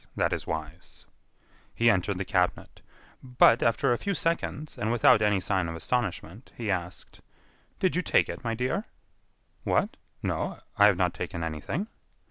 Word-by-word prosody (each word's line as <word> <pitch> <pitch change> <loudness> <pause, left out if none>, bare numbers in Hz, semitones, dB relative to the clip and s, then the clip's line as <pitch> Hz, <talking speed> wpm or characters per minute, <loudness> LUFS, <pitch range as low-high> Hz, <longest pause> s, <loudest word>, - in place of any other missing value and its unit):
That - - +1
is - - -4
wise." 80 +2 -7 0.7
He 115 0 +5
entered 95 0 0
the 95 - -3
cabinet; 90 -1 -1 0.4
but, 125 -2 +4
after 115 +1 +2
a 120 - -2
few 200 -1 -2
seconds, 165 -3 -2
and 110 - -2
without 115 -2 +5
any 105 -2 +3
sign 95 -2 0
of 85 - -5
astonishment, 105 +2 -3
he 110 -4 -2
asked: 90 -1 -5 0.6
"Did 185 - +1
you 180 - +2
take - - +2
it, - - -7
my 115 -1 -1
dear?" 125 - -1 0.8
"What?....No, - - -2 0.2
I - - +7
have - - +3
not - - +1
taken 85 - -5
anything." 80 - -3
105 Hz, 155 wpm, -27 LUFS, 90-125 Hz, 0.8 s, I